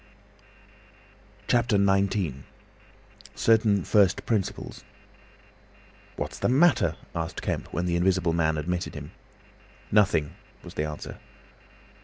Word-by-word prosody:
CHAPTER 120 -3 +2
XIX. 95 -6 +1 1.0
CERTAIN 110 -4 +3
FIRST 100 -3 +3
PRINCIPLES 105 -5 -2 1.3
"What's - - -5
the - - +1
matter?" 150 +5 +4 0.2
asked 80 -1 -4
Kemp, - - -3
when 85 +3 -2
the 85 -1 0
Invisible 90 -1 +2
Man 80 -2 +1
admitted 85 +3 -3
him. - - -8 0.8
"Nothing," 95 -8 +3 0.3
was - - -10
the 75 - -2
answer. 75 -1 -7
95 Hz, 100 wpm, -26 LUFS, 85-105 Hz, 1.3 s, matter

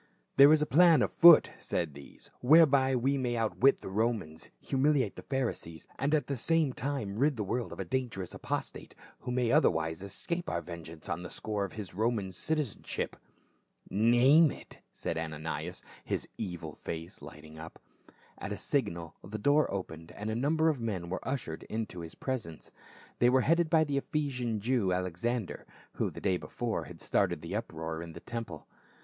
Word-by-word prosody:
"There 140 +2 +9
is 155 -1 +5
a - - +1
plan 160 -1 +6
on - - 0
foot," 170 -2 +8
said 80 -4 -2
these, 70 0 -13
" - - -35
whereby 140 -2 +5
we 135 +3 +1
may 120 -2 -1
outwit 115 +4 +3
the - - -7
Romans, 100 -6 -2
humiliate 135 -4 +1
the - - -8
Pharisees, 120 - -3
and 145 +3 +2
at 145 -4 0
the 140 - -2
same 155 +2 +1
time 125 -7 -3
rid 145 +1 +3
the 105 - -1
world 120 +5 -2
of - - -9
a - - -3
dan 130 -1 -1
gerous 95 -5 -6
apostate, - - -5 0.2
who 125 - -5
may 125 -2 +1
otherwise 80 0 +2
escape 170 - -4
our 85 - -2
ven 85 0 -8
geance 80 -1 -11
on - - -3
the 90 - -7
score 105 -2 -3
of 95 - -9
his 105 -4 -7
Roman 110 -1 0
citizenship." 145 - -3 0.8
"Name 120 - +5
it," - - -10
said 80 - -3
Ananias, 80 -1 -5 0.2
his - - -3
evil 85 -7 -5
face 80 +2 -7
lighting 80 +1 -11
up. 80 +1 -9 0.6
At - - -5
a - - -3
signal 85 -2 -2
the 105 +3 -6
door 145 +8 +3
opened 85 -4 -6
and 105 +4 -4
a - - -2
number 155 +6 +2
of 155 -5 +1
men 95 -7 -3
were 95 - -2
ushered 130 - -3
into 110 -5 -4
his 80 -1 -8
presence. 115 - -5 0.5
They 120 - +5
were 130 +1 +4
headed 165 +3 +2
by 160 -1 +5
the 145 -2 -1
Ephesian 125 -8 -2
Jew, 115 -4 +1
Alexander, 90 +5 -2 0.3
who - - -1
the - - -10
day 95 -2 +1
before - - -3
had - - -11
started 85 -5 0
the 85 +4 -4
uproar 80 -6 -4
in 85 -1 -8
the - - -9
temple. 115 -11 -6
115 Hz, 185 wpm, -31 LUFS, 85-135 Hz, 0.8 s, There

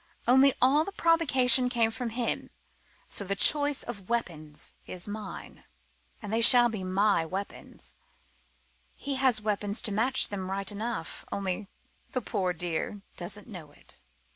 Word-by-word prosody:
Only 265 +2 +5
all 275 +5 +3
the 395 - -7
provocation 265 -8 +3
came 230 -2 +1
from 230 +2 -5
him 235 +1 -4 0.6
so - - -3
the 200 +1 -2
choice 290 +6 +5
of 200 -6 -9
weapons 160 -10 -3
is 180 +1 -1
mine. 210 0 -9 0.6
And 210 0 -6
they 225 - +1
shall 240 +1 +9
be 215 -4 -6
my 190 -1 +1
weapons: 190 +5 -6 1.0
he 280 -1 -3
has 260 -5 +2
weapons 210 0 0
to 215 - -3
match 240 +6 +3
them 190 -2 -5
right 195 +1 -3
enough, 215 -4 -6
only 195 +1 -4 0.5
the 255 - -1
poor 185 -3 -2
dear 175 +3 -4
doesn't 200 +5 -4
know 175 -9 -11
it." - - -17
215 Hz, 145 wpm, -27 LUFS, 195-250 Hz, 1.0 s, shall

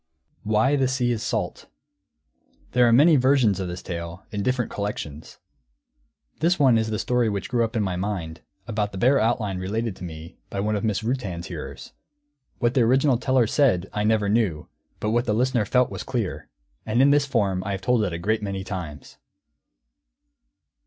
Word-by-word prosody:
WHY 110 +7 +2
THE 135 -2 +2
SEA 125 -2 0
IS 115 -2 -2
SALT - - -2
[Footnote - - -27
1: - - -33
There 125 -1 +4
are - - +4
many 150 +6 +6
versions 130 -6 +3
of 95 - -3
this 90 0 -6
tale, 85 0 -6
in 105 - -3
different 125 +1 -1
collections. 80 -7 -5 1.0
This 170 +3 +2
one 130 -6 +4
is 110 0 -1
the 110 - -1
story 120 +1 +1
which 100 -2 -3
grew 120 -2 +1
up 115 +1 -3
in 110 - +1
my 95 -2 -2
mind, 90 -4 -4 0.3
about 105 -2 -2
the - - -5
bare 130 +7 +4
outline 110 -4 0
related 110 +3 -2
to - - -10
me 80 -1 -9
by 100 - -4
one 105 +2 0
of 105 - -2
Mrs 110 -1 0
Rutan's 105 -9 -3
hearers. - - -8 0.6
What 120 -1 +1
the 130 - +3
original 130 +2 +3
teller 130 -2 +2
said, 110 -7 +1
I 105 - -1
never 105 -1 +2
knew, 100 -8 0 0.3
but 105 - -1
what 120 +2 +1
the 105 - 0
listener 125 -2 +1
felt 125 +4 +2
was - - -5
clear. 115 -7 -4 0.3
And 110 +2 0
in 140 +2 +6
this 145 -1 +3
form 100 -8 0
I 100 - -3
have 95 - -4
told 125 -3 +2
it 100 - -1
a 85 - -3
great 105 +6 0
many 100 -2 -4
times. 90 -6 -7
110 Hz, 195 wpm, -24 LUFS, 95-125 Hz, 1.0 s, many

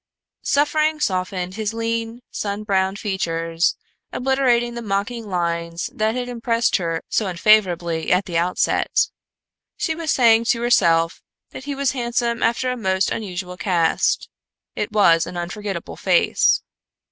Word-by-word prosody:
Suffering 305 +2 +1
softened 185 -5 -2
his 220 +2 -3
lean, 230 +1 -3
sun 205 0 -3
browned 195 -1 0
features, 165 -4 -1 0.3
obliterating 250 -2 +1
the 235 - -5
mocking 215 +2 -3
lines 170 -1 -2
that 220 +1 0
had 250 -1 -3
impressed 235 0 +1
her 165 -2 -3
so 215 - 0
unfavorably 175 -4 +2
at 185 +2 +3
the 175 -4 -6
outset. 175 +2 +1 0.7
She 320 - -1
was 320 0 -5
saying 230 -2 +4
to 230 0 +1
herself 165 -8 +3 0.3
that 265 - -9
he 285 -1 -3
was 275 -1 +1
handsome 235 -2 -1
after 235 +2 +1
a 250 - -3
most 190 -3 0
unusual 180 -3 -5
cast; 170 -4 +1 0.5
it 210 - -3
was 170 -6 +4
an 180 - -7
unforgetable 190 +1 -5
face. - - +3
210 Hz, 135 wpm, -21 LUFS, 180-235 Hz, 0.7 s, saying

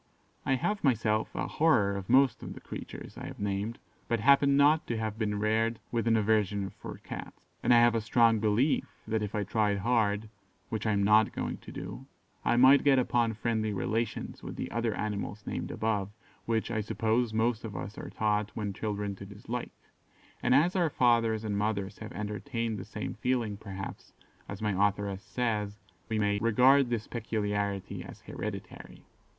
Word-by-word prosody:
I 135 - +4
have, 205 - -1
myself, 110 -5 +2
a - - -1
horror 105 -11 +3
of 95 -1 -6
most 130 +1 +4
of - - -6
the - - -9
creatures - - -8
I - - -6
have - - -9
named, 100 +3 -2 0.3
but 115 - 0
happen 140 +3 +5
not 150 +2 +4
to 115 - -1
have 110 0 -3
been 105 -2 0
reared 110 +2 +1
with 115 -1 0
an 115 -1 +4
aversion 105 -2 +1
for - - -9
Cats, - - -8 0.2
and - - +2
I 120 - +8
have 120 -1 +5
a 115 - +1
strong 115 0 +4
belief 110 +7 +2 0.2
that 110 0 0
if 105 -1 -3
I 105 - 0
tried 105 0 +1
hard 110 0 +1 0.4
(which 110 0 -2
I 110 - +3
am 100 0 +2
not 105 +2 +5
going - - -3
to - - -12
do) - - -7 0.4
I 120 - +2
might 130 +3 +7
get 140 -2 +5
upon 120 -3 +2
friendly 110 -1 -1
relations 110 +3 -2
with - - -7
the - - -5
other 115 -1 -1
animals 105 -1 -4
named - - -4
above, 105 -3 -1 0.4
which, 115 0 0
I 110 -2 0
suppose, 110 +2 0
most 110 +1 +1
of 110 -4 -6
us 105 - -6
are - - -7
taught, 105 -1 0
when 105 -2 -3
children, 105 -1 -3
to 100 - -8
dislike; 115 +4 -5 0.7
and 125 - +3
as 170 +7 +4
our 175 -4 +3
fathers 115 -4 +2
and 105 -2 -2
mothers 100 -1 -1
have 110 +1 -7
entertained 110 +1 -3
the 95 - -7
same - - -5
feeling, 120 -2 -1
perhaps, 95 -2 -8 0.4
as 100 +2 -6
my 105 - +1 0.2
authoress 100 -1 -4
says, 105 0 -2 0.3
we 110 - 0
may 100 -1 +1
"regard 125 +4 +5
this 115 -3 -1
peculiarity 105 -4 -2
as - - -11
hereditary." - - -7
110 Hz, 185 wpm, -30 LUFS, 105-120 Hz, 0.7 s, I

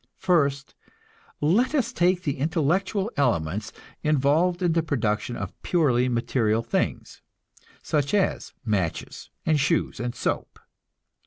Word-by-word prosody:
First, 140 -6 +1 0.7
let 210 - +2
us 250 -3 0
take 180 -1 +2
the 140 -5 -2
intellectual 180 - 0
elements 110 - 0 0.3
involved 155 +5 +2
in 175 - +3
the 165 0 +2
production 120 -6 -1
of 100 -2 -5
purely 130 -8 +2
material 115 -2 +1
things, - - -2 0.6
such 145 -2 0
as 195 -2 0
matches 95 -7 -2 0.2
and 155 -2 +3
shoes 135 - 0
and 120 0 -3
soap. - - -3
145 Hz, 115 wpm, -25 LUFS, 120-175 Hz, 0.7 s, in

